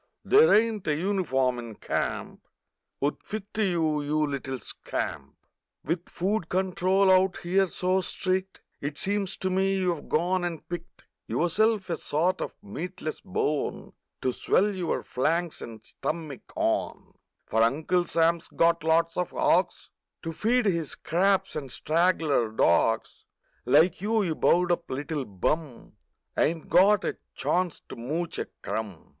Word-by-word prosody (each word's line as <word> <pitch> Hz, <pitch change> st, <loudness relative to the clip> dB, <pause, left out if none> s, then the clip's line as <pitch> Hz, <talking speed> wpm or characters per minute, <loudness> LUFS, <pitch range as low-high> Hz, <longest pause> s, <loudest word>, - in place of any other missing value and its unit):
There 440 Hz, +4 st, +6 dB
ain't 215 Hz, -3 st, +3 dB
a 150 Hz, -, +2 dB
uniform 145 Hz, -9 st, 0 dB
in 115 Hz, -2 st, -8 dB
camp -, -, -3 dB, 0.6 s
'Ould 145 Hz, -, 0 dB
fit 210 Hz, -1 st, -7 dB
to 220 Hz, -, -1 dB
you, 160 Hz, -5 st, +1 dB
you 150 Hz, +1 st, +1 dB
little 135 Hz, -2 st, -4 dB
scamp 75 Hz, -, -5 dB
f -, -, -41 dB, 0.4 s
With 170 Hz, +2 st, -2 dB
food 190 Hz, -1 st, -1 dB
control 190 Hz, +1 st, +2 dB
out 185 Hz, 0 st, +4 dB
here 190 Hz, +2 st, +2 dB
so 185 Hz, +2 st, 0 dB
strict 185 Hz, +1 st, -2 dB, 0.2 s
It 145 Hz, +1 st, -4 dB
seems 200 Hz, -1 st, -1 dB
to 185 Hz, -, -2 dB
me 190 Hz, +1 st, +2 dB
you've 180 Hz, -4 st, -1 dB
gone 180 Hz, +3 st, +1 dB
and 170 Hz, -2 st, -4 dB
picked 175 Hz, -1 st, -8 dB, 0.2 s
Yourself 205 Hz, +4 st, +1 dB
a 165 Hz, -, 0 dB
sort 175 Hz, +7 st, 0 dB
o' -, -, -2 dB
meatless 155 Hz, -, -5 dB
bone 155 Hz, -6 st, -2 dB, 0.3 s
To 130 Hz, -, +1 dB
swell 205 Hz, +10 st, +2 dB
your 180 Hz, -3 st, -2 dB
flanks 165 Hz, +6 st, -1 dB
and 110 Hz, -2 st, -9 dB
stummick 155 Hz, -2 st, -5 dB
on, -, -, -1 dB, 0.3 s
For 110 Hz, -, +1 dB
Uncle 155 Hz, +10 st, +2 dB
Sam's 170 Hz, 0 st, +1 dB
got 165 Hz, -1 st, +2 dB
lots 165 Hz, +1 st, +2 dB
o -, -, +3 dB
r 180 Hz, -, -2 dB
hogs 175 Hz, 0 st, +1 dB, 0.3 s
To 165 Hz, -1 st, -4 dB
feed 230 Hz, +8 st, +1 dB
his 170 Hz, -7 st, 0 dB
scraps, 195 Hz, +3 st, +1 dB
and 140 Hz, -4 st, -5 dB
straggler 160 Hz, -6 st, +1 dB
dogs 110 Hz, +1 st, +1 dB, 0.4 s
Like 160 Hz, +8 st, +4 dB
you, 215 Hz, +1 st, +1 dB
you 170 Hz, -4 st, 0 dB
bowed 175 Hz, +3 st, +3 dB
up 170 Hz, -1 st, -1 dB
little 145 Hz, +1 st, -3 dB, 0.2 s
hum, 150 Hz, -6 st, -1 dB, 0.4 s
Ain't 165 Hz, 0 st, 0 dB
got 200 Hz, +2 st, +5 dB
a -, -, -3 dB, 0.2 s
chance 180 Hz, -2 st, 0 dB
to -, -, -7 dB
mooch 155 Hz, +8 st, -3 dB
a -, -, -3 dB, 0.2 s
crumb! 105 Hz, -7 st, -5 dB
170 Hz, 150 wpm, -27 LUFS, 150-190 Hz, 0.6 s, There